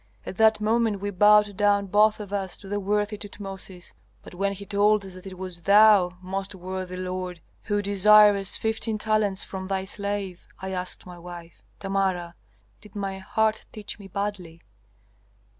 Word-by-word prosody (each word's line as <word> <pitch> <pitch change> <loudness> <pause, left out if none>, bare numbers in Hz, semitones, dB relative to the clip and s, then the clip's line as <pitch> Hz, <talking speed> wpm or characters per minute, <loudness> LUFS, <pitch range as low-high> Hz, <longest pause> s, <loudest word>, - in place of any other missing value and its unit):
At 190 - -7
that 220 -1 +5
moment 220 -1 +1
we 205 +1 -3
bowed 210 +1 +5
down 205 0 +2
both 210 +3 +3
of 205 -1 -8
us 195 -2 -3
to 195 - -12
the 205 +1 -2
worthy 205 +1 -1
Tutmosis. 195 -3 -8 0.3
But - - -12
when 195 +2 -1
he 200 +1 -9
told 205 0 +2
us 190 - -9
that 185 +1 -11
it 185 -1 -9
was 180 -2 -4
thou, 200 -1 +5
most 195 +1 -4
worthy 185 0 -6
lord, 185 -1 -4 0.3
who 205 -1 0
desirest 205 0 +5
fifteen 220 0 -1
talents 210 -2 +1
from 190 -1 -6
thy 190 0 -2
slave, 200 -2 -4
I 190 0 -5
asked 185 -1 -5
my 180 -1 -11
wife, 170 -1 -11 0.2
'Tamara, 190 -3 -1 0.5
did 210 0 -17
my 195 -1 -4
heart 220 +3 0
teach 215 -1 -7
me 200 - -10
badly?' 195 -4 -5
200 Hz, 165 wpm, -25 LUFS, 185-210 Hz, 0.5 s, that